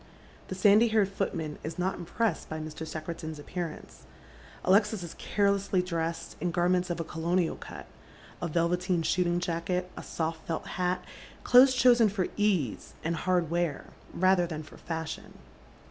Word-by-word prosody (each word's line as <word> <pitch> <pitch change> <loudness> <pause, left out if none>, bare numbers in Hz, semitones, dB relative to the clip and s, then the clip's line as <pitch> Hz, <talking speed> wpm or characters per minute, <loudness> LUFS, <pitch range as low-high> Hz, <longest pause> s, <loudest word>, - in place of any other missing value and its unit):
The 185 - -5
sandy 205 +4 +6
haired 215 -3 +3
footman 160 -6 -3
is 160 +3 -5
not 185 +2 0
impressed 180 +2 -2
by 160 - -4
Mr. 155 0 -6
Secretan's 160 0 -5
appearance. 145 - -7 0.6
Alexis 205 +1 +3
is 170 - -7
cai'elessly 200 -2 +1
drcased 165 -2 -3
in 180 - +1
garments 180 +1 +1
of 175 - -2
a - - -1
colonial 165 +2 0
cut, - - -9 0.6
a 175 - -1
velveteen 175 +2 +1
shooting 175 0 +1
ja*cket, 180 +1 -1
a - - -6
isoft 160 0 -3
felt 160 - -2
hat, 180 0 -1 0.4
clothes 255 +1 +7
chosen 240 -3 +6
for 190 -2 -1
ease 190 - 0
and 165 +1 0
hard 175 -2 0
wear 170 -4 -1 0.2
rather 185 -1 +3
than 155 -2 -5
for 155 - -14
fashion. 160 -1 -5
175 Hz, 150 wpm, -29 LUFS, 165-190 Hz, 0.6 s, clothes